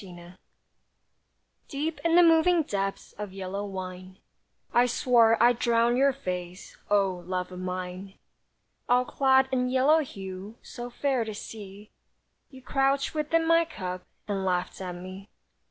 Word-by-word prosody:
LOVE 175 Hz, -2 st, -12 dB, 1.3 s
Deep 305 Hz, +3 st, -3 dB
in 335 Hz, 0 st, +3 dB
the 355 Hz, -, +8 dB
moving 330 Hz, +1 st, +5 dB
depths 195 Hz, -6 st, -3 dB
Of 205 Hz, -2 st, -6 dB
yellow 195 Hz, +1 st, -4 dB
wine, 185 Hz, -1 st, -7 dB, 0.6 s
I 245 Hz, +1 st, +5 dB
swore 235 Hz, -2 st, +4 dB
I'd 240 Hz, +1 st, +4 dB
drown 235 Hz, 0 st, +2 dB
your 275 Hz, +2 st, +4 dB
face, 180 Hz, -7 st, -6 dB
O 195 Hz, -3 st, +1 dB
love 185 Hz, 0 st, -3 dB
of 180 Hz, -, -8 dB
mine; 185 Hz, +1 st, -5 dB, 0.7 s
All 250 Hz, +1 st, +4 dB
clad 265 Hz, 0 st, +3 dB
in 250 Hz, -1 st, +1 dB
yellow 265 Hz, +5 st, +4 dB
hue, 195 Hz, -5 st, -7 dB
So 240 Hz, 0 st, -8 dB
fair 260 Hz, 0 st, 0 dB
to 220 Hz, -1 st, -6 dB
see, 205 Hz, -1 st, -10 dB, 0.6 s
You 265 Hz, -2 st, -14 dB
crouched 275 Hz, 0 st, +1 dB
within 320 Hz, +2 st, +1 dB
my 330 Hz, +1 st, +5 dB
cup 185 Hz, -, -6 dB, 0.2 s
And 200 Hz, -2 st, -2 dB
laughed 180 Hz, 0 st, -2 dB
at 180 Hz, -1 st, -5 dB
me. 185 Hz, +3 st, -10 dB
215 Hz, 140 wpm, -27 LUFS, 185-265 Hz, 1.3 s, the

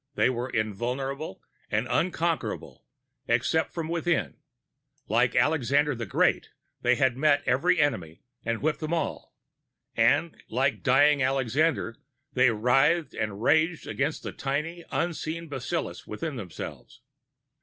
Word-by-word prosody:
They -, -, +3 dB
were 125 Hz, +1 st, -3 dB
invulnerable 125 Hz, +5 st, -3 dB, 0.3 s
and -, -, 0 dB
unconquerable, -, -, -1 dB, 0.4 s
except 160 Hz, 0 st, +1 dB
from 165 Hz, -2 st, -4 dB
within. 170 Hz, -1 st, -1 dB, 0.7 s
Like 120 Hz, +3 st, +2 dB
Alexander 145 Hz, +1 st, +3 dB
the 115 Hz, -2 st, -5 dB
Great, -, -, +2 dB, 0.3 s
they 125 Hz, +1 st, +3 dB
had 130 Hz, -2 st, +2 dB
met 145 Hz, +1 st, +3 dB
every 140 Hz, +8 st, +2 dB
enemy 85 Hz, -, -1 dB, 0.2 s
and 115 Hz, +2 st, -2 dB
whipped 155 Hz, 0 st, +1 dB
them 155 Hz, +1 st, -1 dB
all. 165 Hz, -, -4 dB, 0.6 s
And, 140 Hz, +8 st, +2 dB
like 135 Hz, +4 st, 0 dB
dying 145 Hz, +1 st, +4 dB
Alexander, 135 Hz, 0 st, +1 dB, 0.4 s
they 125 Hz, -1 st, +5 dB
writhed 135 Hz, +9 st, +2 dB
and 105 Hz, 0 st, -3 dB
raged 160 Hz, +4 st, +3 dB
against 145 Hz, +3 st, -2 dB
the -, -, -4 dB
tiny, 150 Hz, +5 st, -3 dB
unseen 165 Hz, 0 st, -2 dB
bacillus 140 Hz, +5 st, -4 dB
within 160 Hz, -4 st, -4 dB
themselves. 105 Hz, +3 st, -8 dB
135 Hz, 125 wpm, -27 LUFS, 120-155 Hz, 0.7 s, they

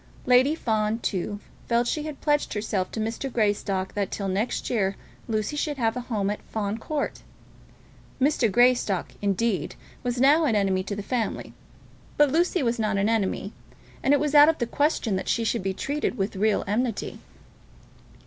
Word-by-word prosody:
Lady 255 Hz, +5 st, +5 dB
Fawn, 220 Hz, -5 st, 0 dB
too, 205 Hz, -2 st, -3 dB, 0.3 s
felt 235 Hz, 0 st, +2 dB
that -, -, 0 dB
she 305 Hz, -, -2 dB
had 300 Hz, -1 st, -7 dB
pledged 295 Hz, -5 st, +1 dB
herself 205 Hz, -3 st, -1 dB
to -, -, -5 dB
Mr. 225 Hz, +5 st, -3 dB
Greystock 205 Hz, -4 st, 0 dB
that 200 Hz, -2 st, -1 dB
till 200 Hz, -, -3 dB
next 195 Hz, +5 st, -1 dB
year 195 Hz, -5 st, 0 dB, 0.3 s
Lucy 215 Hz, +5 st, -1 dB
should 295 Hz, -1 st, -2 dB
have 225 Hz, -3 st, +1 dB
a -, -, -2 dB
home 210 Hz, -5 st, -1 dB
at 210 Hz, -, -5 dB
Fawn 215 Hz, 0 st, -3 dB
Court. 295 Hz, +4 st, -3 dB, 1.0 s
Mr. 265 Hz, -5 st, +2 dB
Greystock, 240 Hz, -5 st, +3 dB
indeed, 200 Hz, -3 st, 0 dB, 0.3 s
was 245 Hz, -1 st, -2 dB
now 295 Hz, +5 st, +5 dB
an 235 Hz, -7 st, +2 dB
enemy 195 Hz, -2 st, +2 dB
to 200 Hz, +2 st, -4 dB
the 205 Hz, -, -5 dB
family; 240 Hz, 0 st, -3 dB, 0.6 s
but 295 Hz, -2 st, +5 dB
Lucy 345 Hz, +1 st, +2 dB
was 235 Hz, -1 st, 0 dB
not 215 Hz, -2 st, 0 dB
an 200 Hz, +2 st, +2 dB
enemy, 205 Hz, -2 st, -1 dB, 0.5 s
and 270 Hz, -, +2 dB
it 290 Hz, -, +5 dB
was 300 Hz, 0 st, -1 dB
out 295 Hz, +1 st, +8 dB
of 325 Hz, -, +1 dB
the 235 Hz, -, 0 dB
question 250 Hz, -6 st, 0 dB
that -, -, -4 dB
she 230 Hz, -, +1 dB
should 230 Hz, 0 st, 0 dB
be 190 Hz, +1 st, -1 dB
treated 280 Hz, +6 st, -2 dB
with 195 Hz, +1 st, -2 dB
real 210 Hz, +2 st, +1 dB
enmity. 225 Hz, +2 st, -2 dB
225 Hz, 180 wpm, -25 LUFS, 205-265 Hz, 1.0 s, out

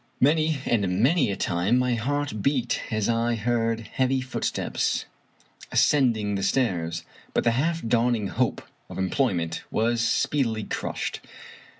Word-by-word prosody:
Many 155 Hz, +3 st, +3 dB
and 100 Hz, -3 st, +1 dB
many 140 Hz, -2 st, +3 dB
a 100 Hz, -, -1 dB
time 90 Hz, +8 st, +1 dB
my 125 Hz, -1 st, +2 dB
heart 130 Hz, -1 st, -2 dB
beat 130 Hz, -2 st, 0 dB
as 110 Hz, -2 st, 0 dB
I 115 Hz, 0 st, +1 dB
heard 115 Hz, 0 st, 0 dB
heavy 130 Hz, +3 st, 0 dB
footsteps 130 Hz, -1 st, -2 dB, 0.7 s
as -, -, +3 dB
cending 115 Hz, -8 st, +3 dB
the 100 Hz, -, -1 dB
stairs, 95 Hz, -7 st, 0 dB, 0.3 s
but -, -, +2 dB
the 115 Hz, -, +3 dB
half 160 Hz, +6 st, 0 dB
dawning 115 Hz, -3 st, +1 dB
hope -, -, -1 dB, 0.3 s
of -, -, -8 dB
employ 95 Hz, +4 st, +1 dB
ment 85 Hz, -1 st, -3 dB
was 115 Hz, +1 st, +1 dB
speedily 115 Hz, -2 st, +1 dB
crushed. -, -, -3 dB
115 Hz, 140 wpm, -25 LUFS, 105-130 Hz, 0.7 s, Many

